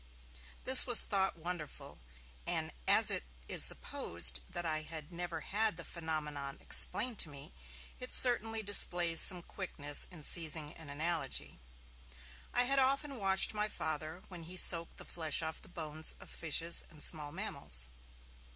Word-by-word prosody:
This 260 +1 +11
was 245 -2 +8
thought 195 -3 -3
wonderful, 170 - -10 0.5
and, - - -4 0.2
as - - +5
it - - -1 0.2
is - - +1
supposed 85 0 -1
that 175 -1 -6
I 155 -1 -3
had 155 0 -9
never 175 -1 -7
had 215 -3 -2
the 170 - -8
phenomenon 150 -4 -8
explained 230 0 +5
to 160 - 0
me, 140 - -12 0.5
it 250 - -9
certainly 225 -3 0
displays 175 -4 +2
some 180 -3 +3
quickness 145 -7 -4
in 170 -5 -13
seizing 155 -2 -3
an 160 -3 -12
analogy. 160 +4 -3 0.9
I 245 - +2
had 275 +2 0
often 275 +1 -1
watched 195 -1 0
my 210 0 -2
Father, 155 -2 -8
while 180 -3 -12
he 175 +3 -8
soaked 170 -2 +4
the - - -10
flesh 160 -1 -1
off 160 0 -8
the - - -12
bones 155 -2 -7
of - - -15
fishes 165 +1 -4
and 155 -3 -6
small 150 -3 -4
mammals. - - 0
170 Hz, 150 wpm, -31 LUFS, 155-195 Hz, 0.9 s, This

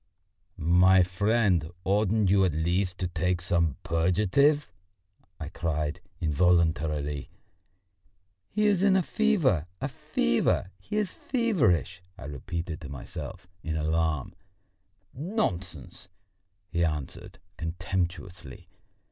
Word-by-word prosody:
"My 90 +3 +5
friend, 95 -2 +1
oughtn't 105 0 +2
you 100 -1 +5
at 90 -5 +2
least 90 +3 0
to 90 - -2
take 90 +1 0
some 85 -4 +1
purgative?" 105 - +2 0.7
I - - -5
cried 80 0 -2 0.2
involuntarily. 80 -3 +1 1.2
"He 210 +1 0
is 200 -3 +3
in 200 -1 +4
a 190 - +3
fever, 170 - +2
a - - -2
fever, 95 - 0
he 150 - -5
is 210 -3 0
feverish!" 95 - +1 0.2
I 100 - -9
repeated 80 +4 -5
to 75 - -8
myself 70 +5 -7 0.2
in 80 -1 -3
alarm. 80 -2 0 0.8
"Nonsense!" 95 - -3 0.6
he 85 0 +1
answered 75 -4 -4 0.2
contemptuously. 85 -2 -4
90 Hz, 105 wpm, -28 LUFS, 80-100 Hz, 1.2 s, My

